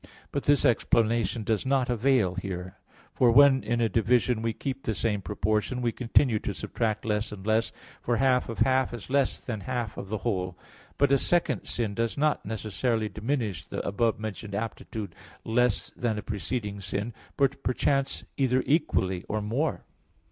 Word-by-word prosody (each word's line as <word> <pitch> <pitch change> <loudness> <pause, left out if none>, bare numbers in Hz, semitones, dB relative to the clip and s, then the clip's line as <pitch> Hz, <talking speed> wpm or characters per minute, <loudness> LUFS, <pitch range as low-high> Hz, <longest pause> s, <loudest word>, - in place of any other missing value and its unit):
But 140 - -2
this 145 0 +4
explanation 115 -2 +2
does 110 0 0
not 130 -1 +1
avail 120 -5 +2
here. 95 -1 -5 0.4
For 125 - +4
when 135 +1 +7
in 120 +1 0
a 115 - +3
division 115 +1 +2
we 115 0 0
keep 135 +4 -4
the 110 - -2
same 105 -2 0
proportion, 105 +6 -1
we 120 -1 0
continue 120 -1 +2
to 100 - -4
subtract 115 0 -2
less 105 -1 -1
and 100 -2 -8
less; 110 +1 +2 0.3
for 120 -1 0
half 125 0 +2
of 115 - -5
half 130 -2 +2
is 120 +2 -8
less 140 -1 +2
than 110 -4 -5
half 120 -1 -3
of 95 - -6
the 110 - -1
whole. 90 -5 -1 0.4
But 140 -1 +3
a 140 - +5
second 175 +4 +1
sin 110 -4 -2
does 115 +4 -1
not 150 +1 +1
necessarily 110 +1 -1
diminish 110 - -2
the - - -5
above 110 +3 +1
mentioned 110 -1 -5
aptitude 110 -3 -5 0.3
less 120 -1 +1
than 115 -3 -2
a 105 - -4
preceding 105 -1 -3
sin, 100 +4 -3 0.2
but 140 0 +1
perchance 135 +2 0
either 130 -1 +2
equally 120 - +1
or 110 - 0
more. 125 +9 -1
115 Hz, 170 wpm, -27 LUFS, 105-130 Hz, 0.4 s, when